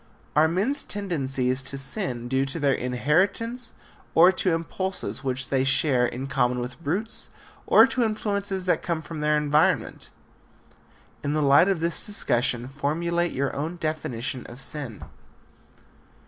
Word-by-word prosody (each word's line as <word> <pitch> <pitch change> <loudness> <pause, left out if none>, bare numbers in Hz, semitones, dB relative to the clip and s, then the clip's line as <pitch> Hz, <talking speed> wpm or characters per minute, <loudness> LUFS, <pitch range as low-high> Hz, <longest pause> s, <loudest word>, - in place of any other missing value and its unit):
Are 155 +1 +5
men's 205 - 0
tendencies 135 -10 -2
to 135 +1 -5
sin 135 - 0
due 130 +2 +1
to 140 +5 -4
their 140 -2 +3
inheritance 190 - 0 0.4
or 175 +3 +8
to 185 0 0
impulses 185 +2 -3
which 130 -1 -1
they 135 -1 +2
share 135 -2 +2
in 125 +3 -5
common 125 -2 +1
with 125 +6 -6
brutes, 195 +10 -1 0.4
or - - +8
to 260 -2 0
influences 200 -3 -2
that 180 - +2
come 165 -2 -2
from 155 0 -7
their 150 0 +2
environment? 150 +1 +1 1.1
In 145 - -1
the 155 0 +1
light 140 +6 +6
of 185 -5 0
this 170 0 -1
discussion 120 - -1
formulate 170 +5 -1
your 140 +1 -2
own 155 +5 -3
definition 145 -7 -3
of 120 - -11
sin. 135 -5 -6
150 Hz, 145 wpm, -25 LUFS, 130-180 Hz, 1.1 s, or